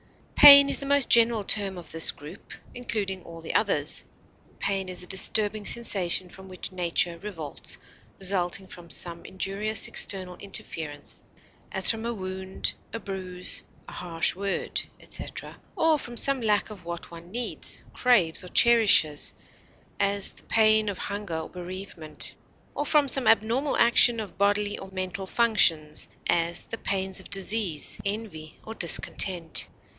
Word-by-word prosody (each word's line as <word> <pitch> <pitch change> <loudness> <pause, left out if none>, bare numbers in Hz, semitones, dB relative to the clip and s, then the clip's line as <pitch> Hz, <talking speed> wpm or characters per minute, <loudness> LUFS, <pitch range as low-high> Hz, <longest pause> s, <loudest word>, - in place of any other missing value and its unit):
Pain 280 -1 +10
is - - +1
the 275 - -6
most 285 -2 +3
general 230 -2 +4
term 195 -2 +1
of 175 - -8
this 165 0 +5
group, 150 +7 -10 0.2
including 210 -6 -4
all 165 0 -11
the 160 - -6
others; 155 -8 +2 0.5
pain 195 -1 -2
is 180 0 -4
a - - +4
disturbing 210 +2 +2
sensation 195 -5 +2
from 190 +1 -12
which 185 0 -7
nature 175 -1 -1
revolts, 165 -8 -7 0.4
resulting 190 0 -1
from 175 -2 -13
some 170 0 +1
injurious 200 +3 0
external 185 -2 -1
interference 155 -7 -4 0.5
(as 190 0 +6
from 225 -1 -6
a 235 - -2
wound, 190 -1 -4 0.2
a 230 - -5
bruise, 185 -3 -5 0.2
a - - -10
harsh 165 -2 -1
word, 200 +1 -3 0.2
etc.), - - -7 0.2
or 320 -2 +2
from 240 -2 -8
some 275 +2 +3
lack 215 -1 0
of 200 -4 -11
what 170 0 -7
one 170 0 -12
needs, 240 +4 -4
craves, 205 -12 +2
or 180 - -10
cherishes 215 -12 +4 0.6
(as, 200 0 0
the - - -17
pain 215 -1 +3
of 195 - -5
hunger 200 -5 -5
or 160 - -6
bereavement), 180 -3 -5 0.4
or 290 - -3
from 295 -2 +3
some 265 -1 +2
abnormal 230 +6 +2
action 235 0 +4
of 210 -3 -8
bodily 205 +1 0
or 190 - -10
mental 190 0 -5
functions 170 -10 +2 0.2
(as, 170 0 0
the 225 - -7
pains 190 -1 -2
of - - -11
disease, 195 -5 0
envy, 200 -7 -6
or 220 - -7
discontent). 170 -2 +1
195 Hz, 150 wpm, -26 LUFS, 175-220 Hz, 0.6 s, Pain